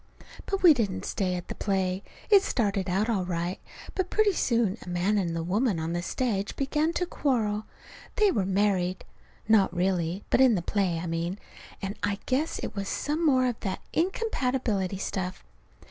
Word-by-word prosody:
But 390 -1 -2
we 340 -3 +9
didn't 215 -8 -2
stay 185 -2 -1
at 175 0 -6
the - - -4
play. 190 -2 -1 0.3
It 400 -2 +8
started 200 - 0
out 195 +4 +1
all 210 -6 +1
right, 175 0 -2 0.3
but 375 -2 -1
pretty 425 -2 +3
soon 230 - +1
a 180 - -9
man 185 +4 +1
and 170 -3 -1
a 165 - -2
woman 200 +2 +1
on 160 +1 -2
the 175 - -1
stage 205 +1 -2
began 300 +4 +1
to 360 - 0
quarrel. 220 -10 0 0.5
They 420 -2 +4
were 205 - +1
married 190 -2 +1 0.4
(not 215 -5 +5
really, 180 0 0
but - - +4
in 255 -4 +6
the 175 - -2
play, 190 -3 0
I 165 - -4
mean), 170 +3 -2 0.5
and 195 +1 -2
I 205 -1 0
guess 285 +5 0
it - - -4
was 195 -1 -3
some 305 +3 -1
more 260 -5 +4
of 245 -3 -1
that 190 -2 -3
incompatibility 255 - 0
stuff. 185 -1 -4
200 Hz, 180 wpm, -27 LUFS, 185-255 Hz, 0.5 s, we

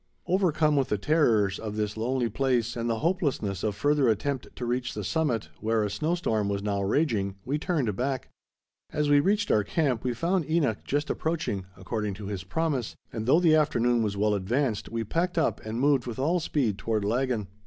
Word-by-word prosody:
Overcome 160 -5 +2
with 135 -2 +1
the 105 - +1
terrors 110 - +2
of 105 -2 -5
this 105 -1 -2
lonely 120 +2 0
place 120 0 0
and 120 0 -2
the 115 -1 -1
hopelessness 140 - 0
of 105 -2 0
further 145 +3 +2
attempt 130 +5 -1
to 125 - -4
reach 120 +1 -2
the - - -4
summit, 145 -10 0
where 110 0 +1
a 105 - -2
snow 155 +9 0
storm 110 -12 0
was 100 0 -2
now 100 -1 -1
raging, 100 -3 0
we 145 +3 -1
turned 145 - 0
back. 130 +3 -2 0.6
As 150 -1 0
we 145 0 +6
reached 205 +6 +1
our 105 - +4
camp 130 0 0
we 125 -1 -1
found 170 +4 0
Enoch 150 -10 +1
just 145 +2 -1
approaching, 155 - -2
according 105 +1 -3
to 105 +1 -8
his 100 -2 -4
promise, 140 +2 -1 0.2
and 110 -1 -4
though 150 +6 +6
the 170 -3 +4
afternoon 120 -6 +3
was 105 -2 -1
well 105 +1 +2
advanced, 110 +4 -1
we 115 0 -2
packed 170 - -1
up 160 - +1
and 110 +2 -4
moved 135 -2 +2
with 120 - -5
all 160 +7 +1
speed 130 - 0
toward 110 -3 -1
Laggan. 120 0 0
120 Hz, 200 wpm, -27 LUFS, 105-150 Hz, 0.6 s, we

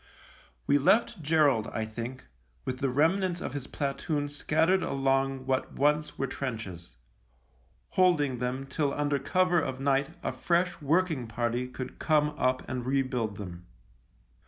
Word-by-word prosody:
We 145 - +4
left 195 - +3
Gerald, 145 -7 +3
I 110 - -3
think, 115 +4 -6 0.4
with 130 0 -3
the 135 - +1
remnants 175 +6 +2
of 135 - -5
his 140 -2 -5
platoon 145 +1 -2
scattered 160 +5 +2
along 135 -1 0
what 130 0 -1
once 150 +2 +1
were 135 - 0
trenches, 100 - -6 0.9
holding 150 -9 +3
them 125 +2 -2
till 140 +1 -1
under 145 -1 0
cover 180 +3 +2
of 130 -3 -3
night 135 0 +2
a - - -1
fresh 175 0 0
working 155 -4 +1
party 120 +2 -1
could 125 0 -7
come 150 -2 +3
up 130 0 +1
and 125 -1 -3
rebuild 125 -5 -1
them. 90 -3 -8
135 Hz, 140 wpm, -29 LUFS, 125-155 Hz, 0.9 s, We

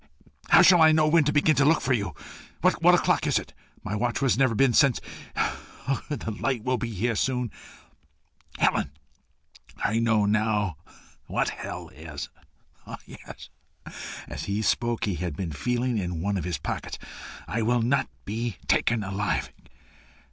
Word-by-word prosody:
How - - +8
shall 180 -2 +7
I 160 0 +8
know 155 -1 +4
when 160 -1 +4
to 150 - +2
begin 150 +1 +3
to 140 - +5
look 155 +3 +4
for 130 - 0
you? 105 -5 -2 0.5
What - - +5
o'clock - - +1
is - - +3
it? - - -5 0.3
My 105 +1 -3
watch 120 +2 0
has 135 -3 +3
never 130 -3 +2
been 130 +2 +4
since. 135 -1 +4 0.4
Ugh! 135 +1 -3
the 145 -6 -3
light 115 +2 -2
will 125 0 0
be 115 - -3
here 115 +3 -1
soon. 125 -1 0 1.1
Helen, 70 - +1 0.8
I 110 +2 0
know 110 -3 +3
now 105 -4 +1 0.5
what - - 0
hell - - -7
is. 80 -2 -8 0.6
Ah! - - -6
Yes." - - -12 0.8
As - - -6
he 100 +2 -1
spoke 120 +1 +1
he 100 - -1
had 85 -4 -4
been 90 -4 -3
feeling 120 - -1
in 90 -3 -3
one 100 +4 -1
of 95 - -2
his 90 -4 -2
pockets. - - -5 0.5
"I 115 - -1
will 120 +1 +2
not 130 +3 +1 0.2
be 115 0 -3
taken 115 -2 +2
alive. 100 +1 -2
115 Hz, 160 wpm, -26 LUFS, 100-130 Hz, 1.1 s, How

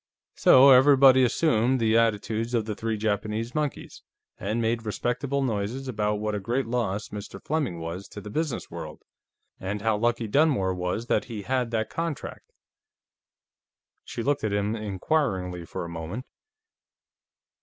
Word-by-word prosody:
So 135 +2 +7
everybody 130 0 +7
assumed 125 -1 +2
the 110 -1 +2
attitudes 115 +1 +1
of 115 -2 +1
the 110 - -3
three 110 +1 -3
Japanese 110 +2 -2
monkeys, 150 -2 -3 0.4
and 105 +4 -2
made 115 0 0
respectable 125 +5 -1
noises 120 +3 -2
about 105 -4 0
what 105 0 -2
a 105 - -1
great 120 +6 -1
loss 115 -4 -2
Mr. 100 -1 -8
Fleming 140 - -2
was 85 +4 -6
to - - -9
the 105 +1 -9
business 155 -2 -3
world, - - -8 0.6
and 100 +2 -4
how 110 -1 +2
lucky 115 +1 0
Dunmore 130 -7 +2
was 90 +5 -3
that 130 - +1
he 110 -5 -6
had 125 +1 0
that 110 -1 -2
contract." 165 -3 -5 1.5
She 115 - -5
looked 145 +2 0
at 110 - 0
him 100 +2 0
inquiringly 95 - -1
for - - -5
a - - -7
moment. 85 +9 -6
115 Hz, 150 wpm, -26 LUFS, 105-130 Hz, 1.5 s, So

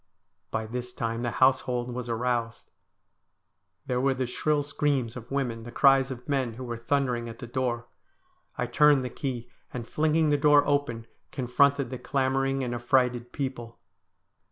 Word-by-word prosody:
By 110 0 -2
this 125 +2 -5
time 115 -1 -3
the 120 - -1
household 125 0 +2
was 125 -1 -5
aroused. 115 -1 -2 1.1
There 125 0 0
were 135 0 +2
the 130 0 -1
shrill 145 +4 0
screams 140 -5 -1
of 120 -2 -9
women, 125 -5 -2
the 120 +1 -9
cries 135 +1 +5
of 125 -2 -8
men, 135 -5 0
who 130 - -7
were 120 -1 -4
thundering 120 -2 0
at 115 - -9
the - - -7
door. 120 -1 -2 0.7
I - - 0
turned 145 -3 +4
the 125 - -4
key, 125 -4 -5 0.2
and, 120 -2 -6
flinging 155 0 +2
the 145 - +4
door 145 0 +5
open, 140 -6 0 0.3
confronted 135 +1 +2
the 130 - -5
clamouring 135 0 0
and 120 -1 -2
affrighted 120 0 +1
people. 125 -4 -5
125 Hz, 160 wpm, -27 LUFS, 120-135 Hz, 1.1 s, cries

